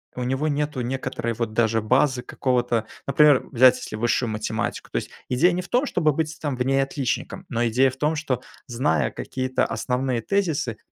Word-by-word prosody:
у 125 - -3
него 135 +4 -1
нету 150 -2 -1
некоторой 120 -2 -3
вот 115 -1 -3
даже 110 -1 +2
базы 130 +3 +2
какого-то. 120 -3 0 0.2
Например, 145 -1 +5
взять 130 0 +6
если - - -7
высшую 120 +2 0
математику. 110 +2 -3
То - - -1
есть - - -3 0.2
идея 160 +9 +4
не 180 +1 -1
в 180 - -11
том, 250 +4 +2
чтобы 155 - +1
быть 160 +2 -2
там 145 -4 -2
в 125 - +1
ней 135 +1 +3
отличником, 135 +7 -3
но 120 -2 0
идея 130 +4 +3
в 130 - -13
том, 150 +3 +1
что, 135 -5 -2 0.3
зная 80 - 0
какие-то 130 0 -2
основные 125 -1 -1
тезисы, 155 - -1
130 Hz, 185 wpm, -24 LUFS, 120-150 Hz, 0.3 s, взять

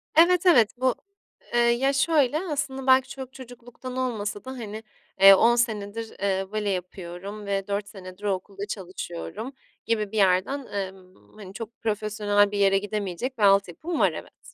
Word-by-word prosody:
Evet, 345 +2 +5
evet, 240 - +6
bu 255 -1 +1 0.6
Eee, 240 - +3
ya, 240 +3 +3
şöyle, 290 -1 +2
aslında, 290 -6 -3
belki 260 0 +5
çok 265 -1 -8
çocukluktan 245 0 -10
olmasa 215 -5 -3
da, 260 - -6
hani, 220 -4 -7 0.4
eee, 195 0 +11
10 235 +4 +4
senedir, 225 -1 -2
eee, 195 -1 0
bale 215 -1 -1
yapıyorum 185 +2 -6
ve 195 -1 -2
4 200 0 -2
senedir 190 -1 -11
o 205 -1 +1
okulda 195 +1 -6
çalışıyorum 190 +5 -6 0.3
gibi 215 -3 -1
bir 220 - -4
yerden, 195 +8 +2
emm, 190 -2 -7
hani, 200 -3 -11
çok 225 +2 -9
profesyonel 210 -2 +1
bir 205 - -3
yere 195 -1 +4
gidemeyecek 205 +4 -3
bir 215 - -1
altyapım 200 - +2
var, - - +4
evet. - - -11
215 Hz, 160 wpm, -25 LUFS, 195-255 Hz, 0.6 s, eee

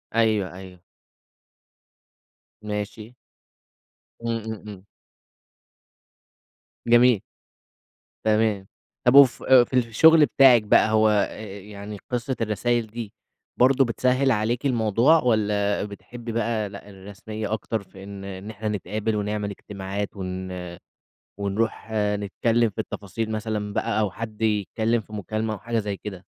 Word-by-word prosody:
أيوه، 110 -5 +2
أيوه. 95 -1 -11 1.8
ماشي. 105 +2 -5 1.1
إمم، 115 0 0
إمم، 110 - -3
إمم. 100 -2 -10 2.0
جميل. 120 -2 +5 1.0
تمام. 110 -3 +1 0.4
طب 125 - +6
وف 140 -3 +7
آآ، 130 -2 +7
ف - - -9
في - - -16
الشغل 150 +7 +6
بتاعِك 130 -6 +6
بقى 105 - +4
هو 110 0 +4
أ 105 -1 +1
أ 100 -1 -8
يعني 105 +1 -9
قصة 125 +1 -1
الرسايل 115 +1 0
دي 110 -1 -7 0.5
برضه 130 +1 +5
بتسهِّل 130 +3 +1
عليكِ 115 +5 0
الموضوع 120 +5 +3
والّا 105 -4 +1
بتحبّي 115 +3 -8
بقى 110 -2 -1
لأ، 100 0 -11
الرسمية 105 +3 -7
أكتر 110 -1 -3
في 95 0 -14
إن 100 0 -8
إحنا 110 0 -6
نتقابل 105 +1 -2
ونعمل 105 0 -2
اجتماعات 100 0 -5
ون 95 -1 -5 0.9
ونروح 105 +3 -2
نتكلّم 105 +2 +1
في 105 - -21
التفاصيل 110 +1 -5
مثلًا 105 -1 -3
بقى 110 - 0
أو 105 -3 0
حد 110 +1 -7
يتكلّم 110 +2 +1
في 105 - -16
مكالمة 110 +2 -3
أو - - -8
حاجة 115 +2 -2
زي 105 -2 -2
كده؟ 100 -1 -7
110 Hz, 125 wpm, -24 LUFS, 100-115 Hz, 2.0 s, وف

